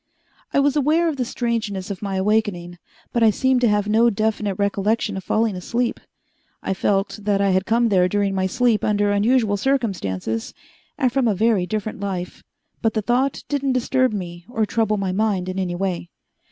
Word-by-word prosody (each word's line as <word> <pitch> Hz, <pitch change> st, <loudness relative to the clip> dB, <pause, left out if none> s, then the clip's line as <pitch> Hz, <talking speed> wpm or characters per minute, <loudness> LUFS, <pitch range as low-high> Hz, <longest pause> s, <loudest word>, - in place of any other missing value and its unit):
I -, -, +2 dB
was 280 Hz, 0 st, +2 dB
aware 310 Hz, +4 st, +2 dB
of 300 Hz, -, -4 dB
the 255 Hz, -, 0 dB
strangeness 220 Hz, -5 st, -2 dB
of 190 Hz, -, -6 dB
my 200 Hz, -2 st, -3 dB
awakening, 190 Hz, -3 st, 0 dB, 0.3 s
but 235 Hz, -, +1 dB
I 225 Hz, -, +6 dB
seemed 260 Hz, +3 st, +2 dB
to 245 Hz, -, +4 dB
have 210 Hz, -1 st, +1 dB
no 225 Hz, +3 st, +4 dB
definite 215 Hz, -2 st, -1 dB
recollection 205 Hz, +2 st, 0 dB
of 190 Hz, -, -5 dB
falling 220 Hz, 0 st, +1 dB
asleep. 235 Hz, +7 st, -2 dB, 0.6 s
I -, -, -1 dB
felt 195 Hz, +2 st, 0 dB
that 200 Hz, -1 st, +1 dB
I 200 Hz, -1 st, +2 dB
had 185 Hz, +1 st, +1 dB
come 230 Hz, +1 st, +2 dB
there 185 Hz, -3 st, +3 dB
during 200 Hz, 0 st, 0 dB
my 190 Hz, -1 st, 0 dB
sleep 235 Hz, +2 st, +1 dB
under 205 Hz, -1 st, +2 dB
unusual 210 Hz, 0 st, +2 dB
circumstances 185 Hz, -, -2 dB, 0.4 s
and 255 Hz, -4 st, +1 dB
from 270 Hz, -3 st, +2 dB
a 210 Hz, -, +2 dB
very 210 Hz, -3 st, +2 dB
different 215 Hz, +2 st, -3 dB
life, 185 Hz, -3 st, -4 dB, 0.4 s
but 225 Hz, 0 st, 0 dB
the 215 Hz, -, 0 dB
thought 255 Hz, +5 st, 0 dB
didn't 275 Hz, -2 st, 0 dB
disturb 255 Hz, +1 st, +1 dB
me 175 Hz, -4 st, -6 dB
or 225 Hz, -3 st, 0 dB
trouble 215 Hz, -1 st, 0 dB
my 195 Hz, -2 st, -1 dB
mind 195 Hz, -2 st, 0 dB
in 185 Hz, +1 st, -3 dB
any 180 Hz, -2 st, -2 dB
way. 180 Hz, -2 st, -3 dB
210 Hz, 190 wpm, -22 LUFS, 190-235 Hz, 0.6 s, I